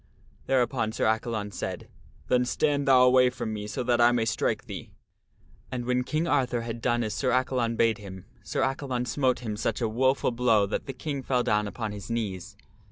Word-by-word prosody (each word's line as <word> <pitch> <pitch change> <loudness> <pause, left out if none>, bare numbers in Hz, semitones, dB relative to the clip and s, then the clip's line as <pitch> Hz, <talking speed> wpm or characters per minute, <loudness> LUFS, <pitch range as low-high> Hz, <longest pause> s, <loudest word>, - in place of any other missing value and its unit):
Thereupon 125 -3 +1
Sir - - 0
Accalon 110 -1 -1
said, 95 - -5 0.2
" - - -28
Then 125 0 +3
stand 145 +2 0
thou 130 -2 +7
away 125 0 +6
from 110 -3 -4
me 105 -1 -5
so 115 - -3
that 120 -1 +2
I 120 0 +6
may 120 -2 +1
strike 110 - -1
thee." - - -7 0.8
And, 125 -2 -3
when 125 0 +1
King 155 +5 -1
Arthur 125 -5 +1
had 115 0 -5
done 120 -1 +1
as 110 -2 -3
Sir 130 +5 0
Accalon 125 -2 +1
bade 115 -1 +2
him, 95 -2 -10 0.2
Sir - - -2
Accalon 130 -2 -1
smote 130 -2 0
him 110 -3 -4
such 105 - -2
a 115 - 0
woful 130 +4 +1
blow 115 -4 +3
that 100 - -4
the 135 - -4
King 140 +1 -4
fell 125 -2 0
down 105 -2 +1
upon 110 +1 -4
his 105 0 -8
knees. 105 -6 -4
120 Hz, 205 wpm, -27 LUFS, 110-130 Hz, 0.8 s, thou